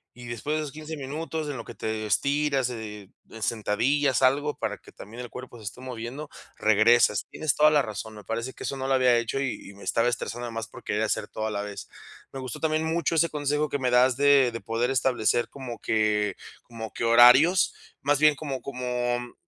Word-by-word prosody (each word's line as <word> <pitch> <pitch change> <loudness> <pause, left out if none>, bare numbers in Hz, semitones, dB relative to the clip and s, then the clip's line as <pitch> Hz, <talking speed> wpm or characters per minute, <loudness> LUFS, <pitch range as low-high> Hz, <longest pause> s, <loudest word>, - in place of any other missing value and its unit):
y 120 0 -10
después 120 +6 -3
de - - 0
esos 150 -2 -5
15 155 +2 -7
minutos 155 +2 -4
en 140 - -4
lo 115 - -6
que - - -9
te 110 -1 -3
estiras, 140 - +1
eh, 105 -4 -7 0.3
sentadillas, 120 +6 +1
algo 145 +3 +2
para - - -3
que - - -17
también 115 +4 -10
el 120 - -10
cuerpo 125 -1 -9
se 110 - -13
esté 105 +5 -7
moviendo, 130 +4 -6 0.3
regresas. 110 0 +4
Tienes 155 -3 -1
toda 150 0 +5
la 150 -1 +4
razón, 110 -2 -6
me 105 -1 -11
parece 115 +5 -4
que - - -16
eso 140 - -3
no 130 - -4
lo 135 - +2
había 130 -2 +4
hecho 115 +3 -1
y 135 -2 -3
y - - -15
me 100 - -14
estaba 115 +1 +1
estresando, 120 0 -4
además 115 -2 -5
por - - -13
querer 105 - -1
hacer 110 -1 -1
todo 110 +1 -4
a - - -3
la 100 -1 -2
vez. 105 -1 -8 0.4
Me 135 - -7
gustó 130 -3 -6
también 155 0 0
mucho 165 +1 0
ese 170 +1 +3
consejo 150 0 0
que 145 - -2
me 130 -1 +1
das 125 +1 +4
de 140 -2 +5
de 115 - -6
poder 120 +2 -1
establecer 120 -2 +1
como 130 -4 -8
que 105 -2 +1 0.3
como 115 -2 -9
que - - -4
horarios 125 +10 +6 0.3
más 145 +1 +2
bien 150 0 +5
como 140 -4 -5
como, 125 -2 -2
mm, 120 0 -9
125 Hz, 220 wpm, -26 LUFS, 115-145 Hz, 0.4 s, horarios